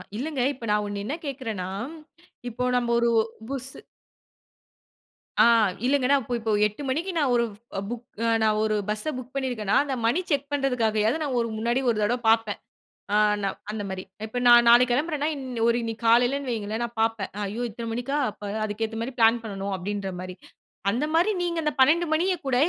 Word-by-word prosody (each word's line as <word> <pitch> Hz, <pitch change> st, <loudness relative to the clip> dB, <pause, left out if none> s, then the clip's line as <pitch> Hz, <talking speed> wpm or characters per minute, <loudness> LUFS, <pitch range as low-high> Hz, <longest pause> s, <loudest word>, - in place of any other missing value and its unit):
இல்லங்க, 270 Hz, +3 st, -2 dB
இப்ப 245 Hz, -3 st, -9 dB
நான் 210 Hz, 0 st, +2 dB
ஒண்ணு 200 Hz, 0 st, -4 dB
என்ன 280 Hz, -, -2 dB
கேக்றன்னா, 225 Hz, -10 st, -4 dB, 0.8 s
இப்போ 245 Hz, +2 st, -4 dB
நம்ம 240 Hz, -1 st, -1 dB
ஒரு 235 Hz, 0 st, +2 dB, 0.4 s
புஸ்ஸு... 270 Hz, -1 st, -5 dB, 1.6 s
ஆ -, -, +8 dB, 0.4 s
இல்லைங்க 270 Hz, -1 st, +2 dB
நான் 280 Hz, -1 st, +4 dB
இப்போ 240 Hz, +2 st, -3 dB
இப்போ 220 Hz, -1 st, -2 dB, 0.2 s
8 210 Hz, +7 st, -10 dB
மணிக்கு 325 Hz, +9 st, -1 dB
நான் 280 Hz, -5 st, +2 dB
ஒரு 235 Hz, -, +3 dB, 0.5 s
புக், 240 Hz, 0 st, -5 dB, 0.4 s
நான் 215 Hz, -1 st, +3 dB
ஒரு 215 Hz, 0 st, +1 dB
பஸ்ஸ 215 Hz, +8 st, -2 dB
புக் 255 Hz, +1 st, -9 dB
பண்ணிருக்கேனா, 245 Hz, -7 st, -1 dB
அந்த 275 Hz, -2 st, -3 dB
மணி 245 Hz, +10 st, +3 dB
செக் 285 Hz, 0 st, 0 dB
பண்ணுறதுக்காயாவது 245 Hz, -2 st, +1 dB
நான் 260 Hz, -4 st, -1 dB
ஒரு 230 Hz, -, 0 dB
முன்னாடி 235 Hz, +3 st, +1 dB
ஒரு 230 Hz, -, +1 dB
தடவ 240 Hz, +4 st, +1 dB
பார்ப்பேன். 225 Hz, -2 st, +2 dB, 0.5 s
அ -, -, +4 dB, 0.3 s
நான் 195 Hz, -1 st, -2 dB
அந்த 210 Hz, -1 st, -4 dB
மாரி 190 Hz, -1 st, -5 dB, 0.2 s
இப்ப 220 Hz, +3 st, -4 dB
நான் 240 Hz, 0 st, +8 dB
நாளைக்கு 240 Hz, +1 st, +6 dB
கெளம்புறேன்னா 295 Hz, +2 st, 0 dB
இன் 270 Hz, -2 st, -7 dB, 0.2 s
ஒரு 235 Hz, 0 st, +3 dB
இன்னைக்கி 225 Hz, 0 st, -5 dB
காலையிலன்னு 245 Hz, +4 st, +3 dB
வையுங்களேன், 220 Hz, +1 st, -3 dB
நான் 235 Hz, 0 st, -10 dB
பார்ப்பேன்.ஐயோ 210 Hz, 0 st, -2 dB
இத்தனை 230 Hz, +2 st, -7 dB
மணிக்கா? 245 Hz, +5 st, -2 dB
அப்போ 205 Hz, 0 st, -10 dB, 0.2 s
அதுக்கேத்த 220 Hz, +1 st, -3 dB
மாரி 250 Hz, +3 st, -4 dB
பிளான் 225 Hz, +1 st, +5 dB
பண்ணணும் 200 Hz, -2 st, -4 dB
அப்படின்ற 195 Hz, +1 st, -4 dB
மாரி. 185 Hz, 0 st, -7 dB, 0.6 s
அந்த 255 Hz, +7 st, 0 dB
மாரி 355 Hz, +6 st, +4 dB
நீங்க 340 Hz, -1 st, -1 dB
அந்த 300 Hz, -, 0 dB
12 320 Hz, +6 st, +5 dB
மணிய 360 Hz, +4 st, +2 dB
கூட, 260 Hz, -, +1 dB
235 Hz, 175 wpm, -25 LUFS, 215-270 Hz, 1.6 s, ஆ